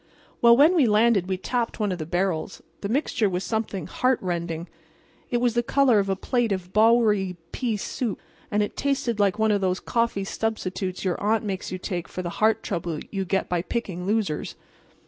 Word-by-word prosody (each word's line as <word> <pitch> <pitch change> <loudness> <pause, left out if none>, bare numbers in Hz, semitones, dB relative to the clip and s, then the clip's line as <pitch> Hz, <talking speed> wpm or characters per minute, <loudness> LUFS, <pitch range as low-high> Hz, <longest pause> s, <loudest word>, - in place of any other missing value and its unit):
"Well, 235 0 +7
when 305 +6 +6
we 305 -9 +4
landed 210 -3 +3
we 190 - 0
tapped 235 +5 -2
one 210 -2 0
of 180 - -3
the 155 - -5
barrels. 180 0 -2 0.2
The 200 - -3
mixture 235 -4 +1
was 180 0 -2
something 215 -6 -2
heartrending. 175 -9 -1 0.6
It 240 - +1
was 240 -1 +1
the 240 - +2
color 250 -2 +3
of 195 -1 -1
a 195 - +1
plate 240 +3 0
of 185 -2 -3
Bowery 215 -4 +4 0.2
pea 235 -5 -1
soup, 220 +2 -3 0.3
and 210 0 +2
it 205 - -5
tasted 270 -5 -1
like 200 0 +2
one 220 0 +3
of 205 -1 +1
those 185 -1 0
coffee 230 -4 0
substitutes 195 -3 -3
your 180 - -1
aunt 220 +2 +1
makes 190 -3 -4
you 185 - -3
take 180 -1 -4
for 185 - -6
the 175 - -3
heart 220 0 +3
trouble 170 -4 -3
you 195 -2 -2
get 190 +2 0
by 175 -1 0
picking 185 -3 -4
losers. 205 -7 -1
205 Hz, 195 wpm, -25 LUFS, 185-230 Hz, 0.6 s, Well